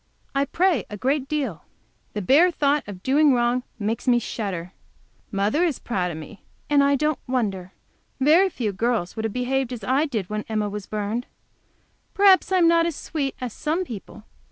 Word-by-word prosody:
I 275 0 +2
pray 335 - +1
a 210 - -6
great 270 +4 0
deal. 270 - -3 0.5
The 210 - -3
bare 300 - +5
thought 295 -3 +1
of 190 -3 -9
doing 280 +1 +4
wrong 240 +1 +1 0.2
makes 225 +3 -3
me 245 -1 +5
shudder. 195 -6 -4 0.6
Mother 210 - +1
is 325 -7 +1
proud 185 -6 -2
of 165 - -6
me, 160 +7 -10 0.3
and 285 -1 +5
I 280 0 +4
don't 300 +1 0
wonder. 195 -8 -2 0.5
Very 320 +8 +5
few 220 - -3
girls 220 -3 -1
would 220 - -3
have 220 - -2
behaved 255 +1 -1
as 240 -4 -6
I 270 +8 +2
did 220 -10 -3
when 210 +1 -3
Emma 215 -1 -1
was 205 -1 -6
burned. 215 +3 -3 0.9
Perhaps 390 -1 +5
I 375 - +4
am 345 -2 +5
not 335 0 +4
as 335 - -3
sweet 285 -4 -3
as 250 -3 -5
some 320 +4 -1
people. 215 - -9
250 Hz, 185 wpm, -24 LUFS, 210-295 Hz, 0.9 s, bare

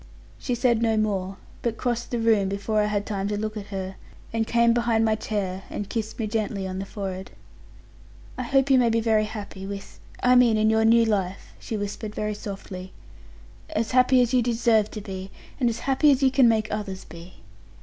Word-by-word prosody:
She 250 - -2
said 240 -2 +2
no 225 -1 +2
more; 195 -3 -1 0.2
but 230 -2 -2
crossed 240 -1 -2
the 240 - -1
room 220 -4 +3
before 200 +2 0
I - - +2
had 205 -1 -1
time 200 -2 -2
to 205 0 -2
look 215 +1 -3
at 205 -1 -6
her, 190 -1 -5 0.4
and 225 -1 0
came 235 0 +4
behind 230 -2 +2
my 220 - +3
chair, 200 -3 -3
and 205 - -4
kissed 220 -1 -3
me 225 - -1
gently 210 -2 -2
on 185 0 -4
the 195 - -5
forehead. 190 -2 -5 1.1
'I - - -4
hope 270 +2 +2
you 260 - +6
may 240 -2 +3
be 230 0 +2
very 220 -1 +2
happy, 205 -3 -7
with 200 0 -8 0.2
I 250 - +5
mean 245 -3 +5
in 215 0 +3
your 220 0 +3
new 230 +1 +5
life,' 195 -4 -2
she 220 - -4
whispered 210 +1 -5
very 210 0 -2
softly; 195 -2 -7 0.8
'as 220 +1 -1
happy 255 0 +5
as 245 +1 -2
you 250 - +4
deserve 230 -2 +2
to 215 - -7
be, 190 -2 -7 0.3
and 245 -3 +3
as 230 0 -4
happy 275 +3 +3
as 275 -1 +3
you 265 - +5
can 260 -2 +5
make 220 -1 +1
others 205 -3 -4
be. 170 +2 -12
215 Hz, 210 wpm, -25 LUFS, 200-235 Hz, 1.1 s, you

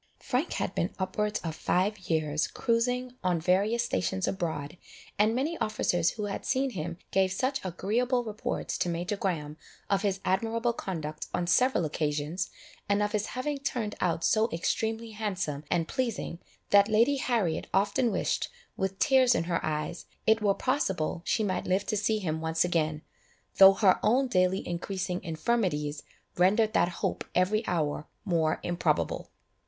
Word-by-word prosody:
Frank 275 +5 -1
had - - -2
been 170 - -1
upwards 210 +2 -1
of 165 -2 -3
five 195 +6 0
years 155 -1 +1
cruizing 245 +1 0
on 180 -2 +1
various 200 +8 +2
stations 190 -4 -1
abroad, 165 -2 -3 0.4
and 215 +2 +4
many 305 +6 -1
officers 175 -5 +1
who 215 - -5
had 200 - -4
seen 265 0 0
him, 170 -3 -4
gave 190 -1 +3
such 260 +8 -1
agreeable 235 +8 0
reports 215 -2 -3
to 180 - +1
Major 175 +4 -2
Graham 155 -6 -3 0.3
of 195 -1 +3
his 195 -2 0
admirable 230 +5 +1
conduct 155 -8 -5
on 175 - 0
several 250 0 +3
occasions, 150 +3 -2 0.4
and 205 +1 +3
of 210 - -1
his 210 -1 -1
having 285 +2 -2
turned 235 -6 -2
out 165 -2 0
so 220 +6 +3
extremely 225 +6 -1
handsome 190 -9 -3
and 165 -2 +1
pleasing, 230 -9 -2 0.3
that 200 0 +7
Lady 235 +6 +4
Harriet 225 -11 0
often 210 +5 +2
wished, - - -1 0.3
with 190 0 -2
tears 255 +1 +4
in - - +1
her 170 0 -1
eyes, 155 +2 -3 0.2
it 220 0 +4
were 200 -2 +3
possible 190 - -1
she 220 - +1
might 190 -3 -1
live 190 +2 +1
to 215 - -1
see 215 +1 +1
him 160 -6 -2
once 160 +1 +1
again, 155 -3 0 0.5
though 195 0 +10
her 195 -2 +4
own 260 +5 +3
daily 185 -4 +1
increasing 180 +1 -3
infirmities 160 -4 -1 0.4
rendered 210 +5 +3
that 175 - +3 0.2
hope - - -1
every 200 +5 +2
hour 155 -3 -1 0.2
more 165 -4 +1
improbable. 175 0 0
195 Hz, 160 wpm, -29 LUFS, 170-225 Hz, 0.5 s, though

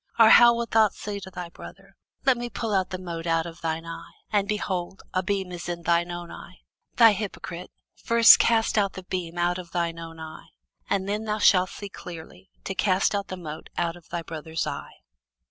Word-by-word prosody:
Or 225 -1 +8
how 235 0 +8
wilt 235 0 -3
thou 220 -1 +5
say 205 0 -6
to 190 -1 -9
thy 180 -2 -7
brother, 195 +3 -13 0.3
Let 265 -2 +5
me 240 0 -5
pull 225 -2 -3
out 190 -1 +1
the 185 - -4
mote 170 -2 -6
out 165 0 +1
of 170 0 -9
thine 165 0 -2
eye; 165 0 -9 0.2
and, 205 -2 +1
behold, 190 -3 -3
a 185 - +1
beam 190 0 -2
is 175 0 -6
in 170 -1 -4
thine 170 +1 +2
own 175 -1 -6
eye? 175 - -12 0.3
Thou 230 -2 +8
hypocrite, 185 -4 -5 0.3
first 230 0 +8
cast 225 -1 +3
out 200 -1 0
the 190 - -8
beam 180 -2 -4
out 175 +1 +1
of 175 -2 -9
thine 170 -1 -2
own 165 -1 -9
eye; 160 0 -9 0.4
and 195 -1 0
then 210 +2 -2
shalt 185 -2 +5
thou - - -11
see 205 - -7
clearly 175 0 -11
to 195 - -3
cast 190 0 +2
out 200 -1 -2
the 185 - -6
mote 155 -3 -8
out 170 -1 -1
of 175 -2 -17
thy 170 -1 -4
brother's 160 0 -4
eye. - - -7
185 Hz, 215 wpm, -25 LUFS, 170-205 Hz, 0.4 s, Or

